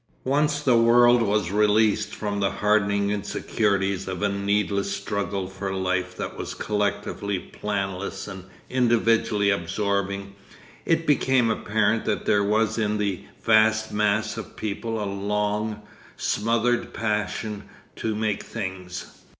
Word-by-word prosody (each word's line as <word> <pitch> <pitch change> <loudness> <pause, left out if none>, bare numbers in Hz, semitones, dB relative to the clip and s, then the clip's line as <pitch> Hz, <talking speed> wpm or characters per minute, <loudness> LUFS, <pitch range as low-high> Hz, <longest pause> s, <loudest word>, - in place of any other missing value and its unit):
Once 145 +2 +1
the 130 -4 +3
world 120 +1 +6
was 105 -4 +1
released 105 +1 +2
from 105 -1 -3
the 100 -1 +2
hardening 100 -1 +1
insecurities 100 -1 -1
of 95 +1 -4
a 100 - +3
needless 100 0 0
struggle 100 -1 -2
for 95 +1 -5
life 95 -1 -1
that - - -4
was - - -5
collectively 105 -1 -1
planless 100 0 -4
and 95 -2 -8 0.2
individually 115 -4 +2
absorbing, 100 +1 -1 0.5
it 165 0 +2
became 130 -5 +3
apparent 110 +1 +1
that - - -1
there 100 0 +3
was 110 +2 +1
in 105 -1 +1
the 100 -3 -1 0.2
vast 110 0 +4
mass 105 +1 +1
of - - -7
people 110 +2 -3
a 105 - -2
long, 105 +2 -2 0.3
smothered 115 +3 0
passion 105 -1 -2 0.3
to 110 -1 -2
make 105 -1 -1
things. 95 -4 -6
105 Hz, 125 wpm, -25 LUFS, 100-110 Hz, 0.5 s, world